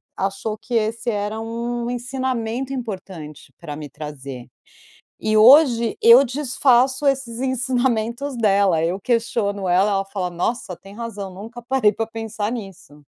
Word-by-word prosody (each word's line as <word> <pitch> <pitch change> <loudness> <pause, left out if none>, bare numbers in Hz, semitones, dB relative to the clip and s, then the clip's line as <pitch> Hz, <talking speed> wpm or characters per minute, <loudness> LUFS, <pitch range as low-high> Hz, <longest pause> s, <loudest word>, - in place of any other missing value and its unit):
achou 200 +3 -3
que 235 +2 -5
esse 225 +1 0
era 210 +1 -2
um 235 +1 -3
ensinamento 250 0 -3
importante 185 - -7
pra 150 -4 -7
me 150 -1 -8
trazer. 140 -4 -8 0.7
E 215 0 0
hoje 235 -1 +6
eu 235 +3 +8
desfaço 260 0 +2
esses 255 -4 -1
ensinamentos 255 0 -1
dela, 195 -6 +3
eu 180 +4 -1
questiono 210 -4 -1
ela, 185 +4 +3
ela 195 0 0
fala: 195 -2 -3
"Nossa, 180 +3 -3
tem 195 +1 -14
razão, 210 -5 -6
nunca 225 +5 -9
parei 245 -4 +2
pra 225 - -2
pensar 225 -1 -4
nisso". 195 -10 -9
225 Hz, 135 wpm, -21 LUFS, 195-245 Hz, 0.7 s, eu